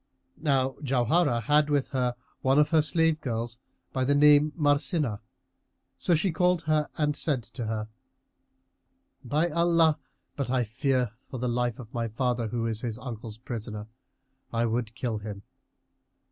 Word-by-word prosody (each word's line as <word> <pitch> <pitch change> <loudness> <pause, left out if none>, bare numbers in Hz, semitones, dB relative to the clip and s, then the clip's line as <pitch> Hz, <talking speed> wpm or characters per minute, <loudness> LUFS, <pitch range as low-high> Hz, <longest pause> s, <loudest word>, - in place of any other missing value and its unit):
Now 135 -3 +1
Jauharah 130 0 +2
had 150 +4 +3
with 145 -2 +1
her 125 -2 0 0.3
one 135 +1 +3
of 150 0 +5
her 160 -2 +5
slave 160 +1 +2
girls, 115 -1 -3 0.3
by 130 - 0
name 145 +2 +5
Marsínah[FN#332]; 145 - +1 0.8
so 175 - +2
she 175 +4 +1
called 180 +1 +2
her 155 -1 +1
and 150 -1 +1
said 140 -6 -1
to 115 0 -6
her, 110 -1 -2 1.4
"By 150 +6 +1
Allah, 165 -1 +3 0.4
but 140 - -2
that 125 - -2
I 125 -1 +2
fear 125 +1 0
for 130 - -9
the 125 +1 -2
life 120 -1 0
of 120 -3 -11
my 115 -1 -1
father, 120 +1 -1
who 115 +1 -2
is 110 -1 -2
his 115 -3 -3
uncle's 115 -3 -7
prisoner, 110 -3 -6 0.7
I 115 0 +1
would 115 -1 -2
kill 120 -4 -2
him! 105 -2 -7
130 Hz, 155 wpm, -28 LUFS, 115-150 Hz, 1.4 s, of